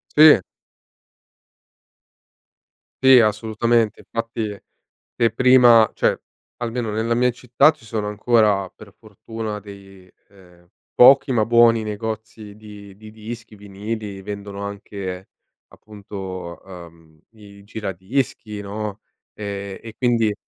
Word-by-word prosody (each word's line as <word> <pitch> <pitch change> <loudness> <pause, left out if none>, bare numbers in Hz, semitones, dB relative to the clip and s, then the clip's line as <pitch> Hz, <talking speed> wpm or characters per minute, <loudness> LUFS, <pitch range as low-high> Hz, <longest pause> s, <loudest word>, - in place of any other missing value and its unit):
Sì. 150 -8 +8 2.6
Sì 130 -1 +8
assolutamente 110 +1 +1
infatti 115 -2 -4 0.6
se 115 -1 +2
prima 120 -1 +6
cioè - - 0 0.4
almeno 120 -1 -3
nella 110 +2 -1
mia 125 +1 +2
città 125 +3 +3
ci 150 -7 -6
sono 105 -1 -3
ancora, 105 -2 +2
per 105 -2 -14
fortuna, 110 0 -7
dei, 95 -2 -14 0.2
ehm, 90 -3 -21 0.3
pochi 135 +2 +6
ma 110 -4 +2
buoni 115 -1 +4
negozi 110 0 -6
di 105 -2 -13
di 110 0 -13
dischi, 110 0 -10
vinili, 100 0 -7
vendono 100 0 -7
anche 100 -2 -7 0.4
appunto, 95 -4 -9
uhm, 85 -4 -14 0.2
i 100 -2 -16
giradischi, 105 +2 -4
no, 105 +1 -6 0.3
ehm, 100 -1 -6
e 115 -1 -9
quindi 115 -4 +1
105 Hz, 105 wpm, -21 LUFS, 100-115 Hz, 2.6 s, Sì